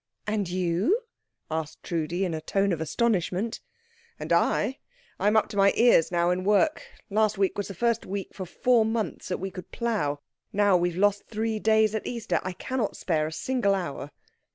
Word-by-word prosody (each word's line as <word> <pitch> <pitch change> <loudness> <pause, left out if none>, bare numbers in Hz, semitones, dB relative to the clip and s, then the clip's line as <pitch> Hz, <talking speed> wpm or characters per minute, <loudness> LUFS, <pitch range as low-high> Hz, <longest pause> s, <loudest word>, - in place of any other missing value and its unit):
"And 210 -3 -1
you?" 185 - +1 0.5
asked 160 -1 -4
Trudi, 170 +3 -1
in 175 - -2
a 160 - -3
tone 195 +4 +1
of 160 - -3
astonishment. 200 +3 0 0.6
"And - - -1
I? 265 - +2 0.4
I 200 - +1
am 210 +1 +4
up 220 - +3
to 205 - -6
my 200 0 +5
ears 230 -9 +5
now 175 0 +2
in 180 +1 -1
work. 210 +11 +3 0.3
Last 215 0 +2
week 195 -1 +1
was 205 - -3
the 195 - -8
first 235 +4 +1
week 195 0 -4
for 185 -2 -6
four 245 +4 +3
months 220 0 -2
that 180 - -2
we 190 +1 -5
could 185 -1 -9
plough. 205 -12 -1 0.3
Now 205 -1 +3
we 175 0 +2
have 175 - -8
lost 205 +1 +3
these - - -29
three 220 0 -1
days 220 0 +3
at 220 - -3
Easter. 235 -2 -1
I 185 - -4
cannot 245 +3 -3
spare 155 -4 0
a - - -6
single 200 +2 0
hour." 145 -6 -4
200 Hz, 200 wpm, -27 LUFS, 175-220 Hz, 0.6 s, my